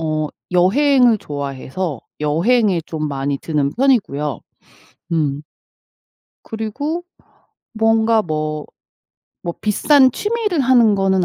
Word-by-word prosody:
어 155 -1 -1 0.2
여행을 240 +5 +4
좋아해서 145 - -5 0.2
여행에 180 +4 +2
좀 155 -2 -3
많이 140 0 -2
드는 145 -3 -1
편이고요. 150 - +1 0.7
음. 145 -3 0 1.0
그리고 285 +10 -4 0.7
뭔가 225 0 +3
뭐, 155 -3 -3 0.8
뭐 170 -1 -4
비싼 260 +5 +4
취미를 420 -6 -1
하는 240 -5 +4
거는 190 -2 +1
190 Hz, 200 characters per minute, -19 LUFS, 150-240 Hz, 1.0 s, 여행을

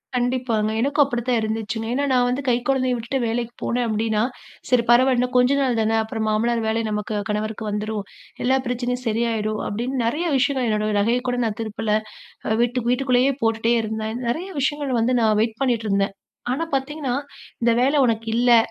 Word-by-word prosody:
கண்டிப்பாங்க. 245 -3 0
எனக்கும் 285 +3 +3
அப்படிதான் 240 -2 0
இருந்ததுங்க. 220 -1 -2
ஏன் 225 - -4
என்றால், 280 +3 0
நான் 245 -1 +3
வந்து 255 +3 -1
கை 240 - +4
குழந்தையை 255 -2 +2
விட்டுவிட்டு 235 +4 -2
வேலைக்கு 235 +1 -2
போனேன் 245 0 0
அப்படி 220 +1 -1
என்றால், 220 +4 +1 0.4
சரி 250 -2 +4
பரவாயில்லை 255 +1 +5
இன்னும் 250 +1 -1
கொஞ்ச 250 +2 +4
நாள் 245 -4 +1
தான்! 220 +1 +1
அப்புறம் 220 0 -3
மாமனார் 230 +2 +1
வேலை 225 +1 0
நமக்கு 210 0 -3
கணவருக்கு 215 +1 -2
வந்துவிடும். 210 0 -3 0.4
எல்லா 260 +2 +3
பிரச்சனையும் 250 0 -2
சரியாகிவிடும். 220 -1 0
அப்படி 225 +4 -3
என்று 260 -2 -1
நிறைய 300 +9 0
விஷயங்கள் 260 -2 +1
என்னோட 215 0 0
நகையை 235 +4 +2
கூட 245 - -1
நான் 215 -1 -3
திருப்பவில்லை. 215 0 -1 0.5
அ 220 - +2
வீட்டுக்கு 240 0 0
வீட்டுக்குள்ளேயே 255 +1 +2
போட்டுக்கொண்டே 225 +1 +2
இருந்தேன். 220 +1 -3
நிறைய 335 +11 -2
விஷயங்கள் 275 -3 0
வந்து 240 +3 +2
நான் 215 -2 +3
வெயிட் 225 +2 -1
பண்ணிக்கொண்டு 240 -5 +1
இருந்தேன். 195 0 +1 0.4
ஆனா, 300 +6 -1
பார்த்தீங்க 275 +3 -2
என்றால், 275 +1 -1 0.4
இந்த 235 - +4
வேலை 270 +4 +3
உனக்கு 225 -1 0
இல்லை, 240 0 +5
235 Hz, 185 wpm, -22 LUFS, 220-255 Hz, 0.5 s, பரவாயில்லை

